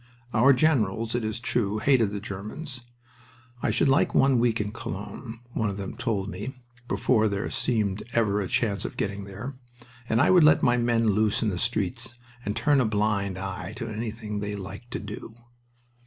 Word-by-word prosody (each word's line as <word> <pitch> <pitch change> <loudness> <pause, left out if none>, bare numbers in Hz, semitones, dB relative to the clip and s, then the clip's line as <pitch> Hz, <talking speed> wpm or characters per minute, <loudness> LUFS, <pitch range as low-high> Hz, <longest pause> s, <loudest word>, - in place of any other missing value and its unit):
Our 125 +5 +6
generals, 115 -6 +2
it 120 - 0
is 110 0 -2
true, 115 -4 0
hated 120 -2 +3
the 100 0 -4
Germans. 110 +8 -6 0.8
"I - - +1
should - - +2
like 135 +1 +3
one 135 -2 +5
week 115 -1 +2
in 105 -1 -2
Cologne," 115 +2 -7
one 105 - 0
of 100 - -4
them 100 -1 -5
told 110 -6 -1
me, 105 +7 -5 0.3
before 110 -4 +2
there 100 -1 -1
seemed 105 -5 0
ever 105 -3 +2
a 95 - -2
chance 100 -2 0
of - - -6
getting 100 -1 -2
there, 110 +8 -6 0.6
"and 110 - +3
I 145 - +5
would 180 -3 +7
let 155 - +6
my 120 -2 +5
men 120 -1 +2
loose 105 +2 +2
in 110 - +2
the 90 -3 -3
streets 115 +2 -2 0.3
and 105 -2 -2
turn 145 -2 +3
a - - +2
blind 105 -3 0
eye 95 0 -5
to 115 - -5
anything 110 -1 -4
they 105 0 -3
liked 100 +5 -8
to 125 - -3
do." 105 +2 -8
110 Hz, 185 wpm, -26 LUFS, 100-120 Hz, 0.8 s, would